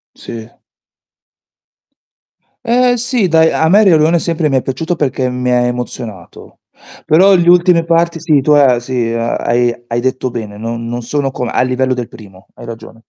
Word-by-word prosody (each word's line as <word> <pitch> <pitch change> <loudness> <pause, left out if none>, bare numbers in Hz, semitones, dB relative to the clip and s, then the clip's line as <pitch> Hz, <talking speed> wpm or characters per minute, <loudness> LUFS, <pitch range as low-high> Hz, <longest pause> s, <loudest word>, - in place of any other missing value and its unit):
Sì. 115 -1 -9 2.2
Ehm, 245 +1 +2
sì 240 -4 -1
dai, 160 0 +3
a 160 - +1
me 205 +5 +5
Il 195 - +4
Re - - +5
Leone 160 +3 +2
sempre 165 -2 -1
mi 135 - +1
è - - 0
piaciuto 160 +8 -3
perché 130 -3 -1
mi 125 0 -3
ha 125 - +3
emozionato. 120 -5 -6 0.5
Però 190 +5 +4
gli 175 -1 +1
ultime 175 -1 +4
parti 170 0 0
sì, 155 -3 +1
tu 150 - 0
ha 135 -5 +4
sì 120 -2 -3
a 115 0 -2
hai 120 0 0
hai 120 0 -2
detto 130 0 -2
bene, 110 -4 -7
non 115 +2 -5
non 120 +1 -4
sono 135 +3 -2
come 125 -2 -4
a - - +1
livello 130 +1 0
del 125 -2 -5
primo, 95 -4 -15
hai - - -12
ragione. 115 -1 -10
130 Hz, 185 wpm, -14 LUFS, 120-165 Hz, 2.2 s, me